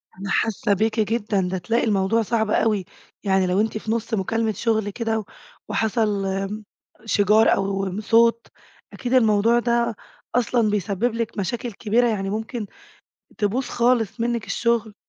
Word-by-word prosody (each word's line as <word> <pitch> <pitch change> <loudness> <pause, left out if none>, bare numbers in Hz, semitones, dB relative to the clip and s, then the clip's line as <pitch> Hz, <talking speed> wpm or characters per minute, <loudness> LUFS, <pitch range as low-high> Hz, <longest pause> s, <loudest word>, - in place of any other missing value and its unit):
أنا 195 +1 -7
حاسة 210 -1 +1
بيكِ 220 +3 0
جدًا، 215 -2 0
ده 190 +1 -2
تلاقي 225 +7 0
الموضوع 210 +1 +2
صعب 220 -1 0
أوي، 210 -3 +1 0.4
يعني 190 -2 +2
لو 185 +3 +2
أنتِ 220 0 -1
في 215 0 -4
نص 230 0 -2
مكالمة 220 +2 0
شغل 220 0 0
كده 225 +1 -2 0.4
وحصل 215 -3 0
آمم، 195 +2 -3 0.4
شِجار 210 +1 +4
أو 195 0 -2
صوت، 230 +1 +3 0.5
أكيد 245 0 -4
الموضوع 225 -1 +4
ده 235 -1 0 0.4
أصلًا 240 -2 +2
بيسبب 210 +3 -1
لِك 230 -1 -3
مشاكل 235 +6 -3
كبيرة، 230 +4 +1
يعني 195 -4 -1
ممكن 220 +2 -4 0.7
تبوظ 220 +5 0
خالص 240 -3 +1
منِّك 235 -1 -1
الشغل. 235 -3 0
220 Hz, 145 wpm, -23 LUFS, 200-230 Hz, 0.7 s, شِجار